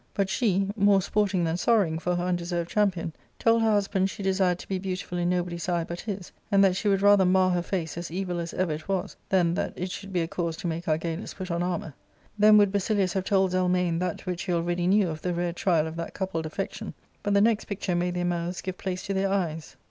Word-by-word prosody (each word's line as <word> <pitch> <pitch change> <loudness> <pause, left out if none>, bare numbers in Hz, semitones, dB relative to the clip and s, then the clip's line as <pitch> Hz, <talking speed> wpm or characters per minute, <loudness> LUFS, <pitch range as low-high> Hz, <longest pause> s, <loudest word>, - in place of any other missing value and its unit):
But 195 -1 +1
^e^more 200 -2 +2
sporting 200 -3 +1
than 165 0 0
sorrowing 185 -7 +2
for 180 +1 -1
her 175 - -1
undeserved 175 -1 -2
cham 210 -1 +4
pion, 170 -3 -5 0.2
told 230 0 +3
her 225 - +3
husband 195 -2 +1
she 200 - -7
desired 190 -2 +2
to - - -11
be 190 -1 -2
beautiful 185 -1 -4
in 175 0 +1
no 180 -1 +1
body's 170 0 -5
eye 170 -1 +1
but 170 +1 -6
his, 200 -4 -6 0.2
and 200 0 +5
that 190 -2 +4
she 210 - -2
would 195 -1 +2
rather 205 -1 +6
mar 185 0 +4
her 175 -1 +1
face 170 -3 -3
as 170 - -5
evil 180 0 -3
as 170 0 -4
ever 185 -3 0
it 155 +1 -7
was 195 0 -2
than 175 -3 +3
that - - -2
it 180 +1 -4
should 200 +1 -7
be 180 -2 +1
a 165 - -1
cause 170 -1 -3
to 190 - -8
make 170 0 -3
Argalus 160 +3 -2
put 185 -2 -5
on 170 0 -1
armour. 175 -4 -2 0.5
Then 210 +1 +7
would 205 -2 +5
Basilius 200 -2 +1
have 190 -1 -1
told 190 -2 +2
Zelmane 180 -2 +1
that 180 0 -3
which 180 -1 -3
he 180 - -2
already 175 +1 0
knew 200 0 +4
of 155 -1 -5
the 180 -1 -1
rare 175 0 -1
trial 170 -3 +2
of 160 +1 -6
that 165 - -5
coupled 175 -5 -2
affection, 200 +6 -5 0.3
but 205 0 0
the - - +6
next 220 0 +2
picture 200 -3 -3
made 175 +1 0
their 175 0 -1
mouths 175 0 -2
give 185 -1 -5
place 185 -2 -4
to 195 - -2
their 195 0 +1
eyes. 165 -5 -2
180 Hz, 245 wpm, -27 LUFS, 175-195 Hz, 0.5 s, Then